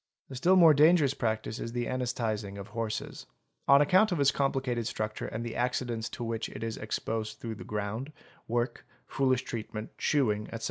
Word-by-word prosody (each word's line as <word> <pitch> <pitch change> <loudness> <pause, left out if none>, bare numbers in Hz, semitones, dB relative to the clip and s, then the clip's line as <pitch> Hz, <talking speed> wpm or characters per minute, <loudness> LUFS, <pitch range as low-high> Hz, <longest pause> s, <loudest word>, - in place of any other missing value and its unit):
— - - -51
A - - -6
still 175 +9 +4
more 165 -4 +8
dangerous 150 -1 +5
practice 110 -3 -2
is 115 - -5
the 120 -1 -1
anesthetising 110 -5 -2
of 100 - -8
horses. 115 -2 -4 0.4
On 140 +1 +7
account 190 +8 +4
of 175 - 0
its 140 0 +5
complicated 130 -4 0
structure 110 -2 -3
and 115 +2 -4
the 115 - -5
accidents 120 -2 -1
to - - -4
which 115 -1 -3
it 110 - -7
is 115 -1 -3
exposed 110 0 -3
through 115 -1 -5
the 105 - -9
ground, 105 +7 -4 0.4
work, 120 +1 -2 0.2
foolish 130 -1 +1
treatment, 110 -2 -6
shoeing, 105 -8 +1
etc. 115 - -6
120 Hz, 185 wpm, -30 LUFS, 110-135 Hz, 0.4 s, more